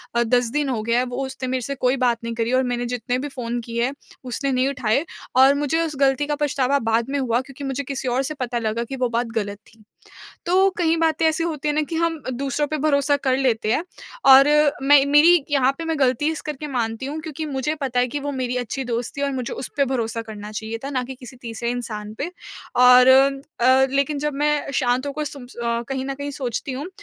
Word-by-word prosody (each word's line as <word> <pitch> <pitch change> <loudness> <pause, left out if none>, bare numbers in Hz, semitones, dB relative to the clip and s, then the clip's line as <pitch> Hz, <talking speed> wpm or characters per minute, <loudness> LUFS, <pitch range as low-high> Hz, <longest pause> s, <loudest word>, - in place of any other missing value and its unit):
अ, 235 - +3
10 245 0 +2
दिन 295 0 0
हो 235 -4 -1
गया 235 +2 +2
है, 255 - +1
वो 250 +2 -3
उसने 265 0 -6
मेरे 260 -1 -1
से 275 +4 -4
कोई 255 0 +1
बात 245 -2 +2
नहीं 230 0 -3
करी 230 +1 -1
और 260 - +3
मैंने 245 -1 -2
जितने 245 0 -2
भी 290 - -4
फ़ोन 240 -3 -4
किए 235 0 -2
हैं, 265 - -2 0.3
उसने 260 +2 -2
नहीं 255 +1 +2
उठाए। 275 +2 0 0.3
और 265 +2 +7
मुझे 295 +3 0
उस 310 -2 -5
गलती 275 +1 +3
का 295 - 0
पछतावा 280 -2 +1
बाद 225 +1 0
में 285 - -1
हुआ 245 -2 +1
क्योंकि 275 +1 -11
मुझे 270 +1 -3
किसी 270 -1 -4
और 250 +2 +1
से 305 +3 -3
पता 245 -1 -2
लगा 225 +1 -1
कि 270 +3 -6
वो 250 -2 0
बात 235 +1 0
गलत 205 -2 -2
थी। 220 -1 -21 0.6
तो 375 +3 +4
कहीं 330 -2 +2
बातें 325 0 +1
ऐसी 315 +1 0
होती 305 -3 -3
हैं 295 - +1
ना 310 - +2
कि 330 - -3
हम 330 -2 0
दूसरों 275 +3 -1
पे 310 - -2
भरोसा 285 -1 +2
कर 260 -2 0
लेते 225 -5 +1
हैं 315 - +1 0.5
और 270 +1 +9 0.4
मैं 280 0 +6
मेरी 295 +3 +6
यहाँ 270 -2 +3
पे 330 - -5
मैं 325 -1 -1
गलती 265 +3 +2
इस 315 - -5
करके 300 0 -6
मानती 235 -2 -2
हूँ, 295 +3 -4
क्योंकि 310 0 -5
मुझे 285 +1 -2
पता 250 -2 0
है 250 - +2
कि 290 +4 -4
वो 285 0 -3
मेरी 250 -2 -2
अच्छी 250 +2 -3
दोस्त 240 +2 -3
थी - - -2
और 280 0 0
मुझे 255 -2 -3
उसपे 280 +1 -2
भरोसा 230 -3 -2
करना 210 -2 -9
चाहिए 220 +1 -5
था 275 - -4
ना 255 -3 -1
कि 260 +1 -8
किसी 255 0 -12
तीसरे 230 0 -4
इंसान 215 -4 -5
पे। 340 +6 -3 0.4
और 250 0 +7
अ, 265 -1 +4
लेकिन 280 +1 0
जब 300 0 -2
मैं 295 0 0
शांत 255 0 +1
होकर 300 +2 -3
सुन 280 -2 -7
अ, 235 -1 -3
कहीं 265 0 -2
न 275 - -3
कहीं 285 +1 -5
सोचती 260 -1 -4
हूँ, 280 +6 -5
265 Hz, 240 wpm, -22 LUFS, 245-285 Hz, 0.6 s, और